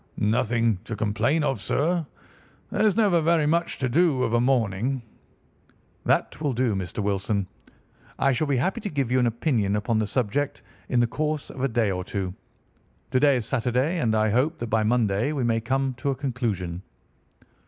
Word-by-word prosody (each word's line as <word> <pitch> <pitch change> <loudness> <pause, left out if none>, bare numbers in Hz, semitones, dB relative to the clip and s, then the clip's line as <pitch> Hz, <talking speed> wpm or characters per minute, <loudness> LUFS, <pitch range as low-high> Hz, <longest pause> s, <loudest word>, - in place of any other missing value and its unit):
"Nothing 115 -1 +1
to 115 - -4
complain 110 +9 +1
of, 135 -7 -1
sir. 165 - 0 0.7
There's 215 -3 +2
never 200 -7 +3
very 160 -1 +3
much 170 +3 +1
to 130 - 0
do 140 -1 +2
of 115 - -1
a 120 - +3
morning." 120 0 0 1.0
"That - - +1
will 145 -4 0
do, 120 -2 +1
Mr. 95 +2 -3
Wilson. 100 0 0 0.7
I 135 - +3
shall 140 +5 0
be 140 -2 +1
happy 190 - 0
to 205 - -3
give 140 -7 -1
you 130 - +3
an 125 - +3
opinion 115 -4 0
upon 110 +2 0
the 110 - 0
subject 130 +5 -1 0.3
in 125 - +2
the - - +4
course 150 +5 -2
of 130 - -8
a 135 - +2
day 115 -4 +1
or 90 -1 -3
two. 95 -1 -4 0.8
To 130 - +3
day 140 0 +5
is 120 - -3
Saturday, 130 +8 0
and 110 -6 +1
I 110 0 +2
hope 140 +9 +1
that 120 -5 -5
by 110 0 +3
Monday 110 +3 +1
we 140 -4 -1
may 115 -1 +1
come 135 +2 0
to 140 - -1
a 135 - 0
conclusion." 115 -10 -3
125 Hz, 185 wpm, -25 LUFS, 110-140 Hz, 1.0 s, day